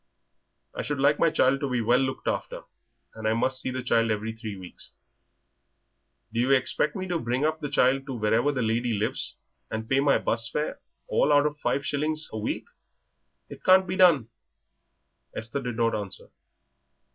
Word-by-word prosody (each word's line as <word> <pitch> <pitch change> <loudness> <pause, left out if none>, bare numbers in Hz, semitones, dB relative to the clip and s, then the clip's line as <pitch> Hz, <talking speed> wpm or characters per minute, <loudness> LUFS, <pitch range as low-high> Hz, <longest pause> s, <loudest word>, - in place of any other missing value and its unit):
"I - - -4
should 145 - -3
like 140 +2 +3
my 165 - +4
child 135 -2 +2
to 140 -1 -2
be 125 -1 0
well 120 +2 +3
looked 130 0 -2
after, - - -3 0.5
and 110 -1 -4
I 110 - +3
must 130 +3 +1
see - - -2
the 130 0 -4
child 115 -2 +2
every 110 +1 -2
three 110 -3 -7
weeks." 90 -1 -8 1.4
"Do 115 - -1
you 125 +2 +2
expect 135 +2 +2
me 185 -1 -4
to 175 -2 -1
bring 125 +2 -1
up 155 0 0
the 145 -2 -4
child 135 +2 +2
to 135 - -4
wherever 115 +5 +2
the 130 -4 -1
lady 115 +2 0
lives, 105 +1 -1 0.3
and 110 0 -4
pay 135 +3 +2
my 140 0 +4
'bus 115 0 -1
fare, 150 +5 -3 0.3
all 150 - +2
out 145 0 +5
of 150 0 -2
five 140 0 -1
shillings 155 +2 0
a 110 - -3
week? 105 - -3 0.8
It - - -11
can't 190 0 +6
be 185 +1 -3
done!" 170 - +5 1.1
Esther 115 +5 -3
did 125 -3 -4
not 115 -1 +2
answer. 100 -3 -5
130 Hz, 185 wpm, -26 LUFS, 115-145 Hz, 1.4 s, can't